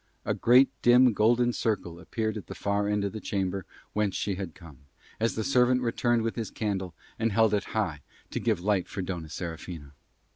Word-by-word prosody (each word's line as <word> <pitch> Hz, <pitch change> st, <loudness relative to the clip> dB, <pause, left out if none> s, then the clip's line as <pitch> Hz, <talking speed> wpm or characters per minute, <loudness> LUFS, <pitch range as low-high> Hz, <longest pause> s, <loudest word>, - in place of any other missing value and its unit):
A -, -, +1 dB
great 125 Hz, +3 st, +5 dB
dim 125 Hz, 0 st, +6 dB
golden 120 Hz, +3 st, +3 dB
circle 90 Hz, -8 st, -2 dB
appeared 110 Hz, +3 st, -2 dB
at 105 Hz, -, -7 dB
the -, -, -7 dB
far 100 Hz, 0 st, 0 dB
end 105 Hz, -1 st, +1 dB
of 100 Hz, -, -2 dB
the 110 Hz, -, -4 dB
chamber 95 Hz, -2 st, -2 dB, 0.3 s
whence 105 Hz, -3 st, 0 dB
she 100 Hz, -, -1 dB
had 95 Hz, -4 st, -5 dB
come, 80 Hz, -7 st, -14 dB, 0.4 s
as 115 Hz, +1 st, +1 dB
the 110 Hz, -, -1 dB
servant 125 Hz, 0 st, +3 dB
returned 120 Hz, 0 st, +1 dB
with 115 Hz, -, -2 dB
his 115 Hz, -3 st, -3 dB
candle 95 Hz, -5 st, -3 dB, 0.2 s
and 115 Hz, 0 st, +1 dB
held 110 Hz, +1 st, +3 dB
it 105 Hz, -, +1 dB
high -, -, -2 dB, 0.3 s
to -, -, -2 dB
give 110 Hz, -6 st, +1 dB
light 95 Hz, -1 st, +1 dB
for 95 Hz, -, -4 dB
Dona 85 Hz, -4 st, -5 dB
Serafina. 80 Hz, -3 st, -7 dB
105 Hz, 195 wpm, -28 LUFS, 95-115 Hz, 0.4 s, dim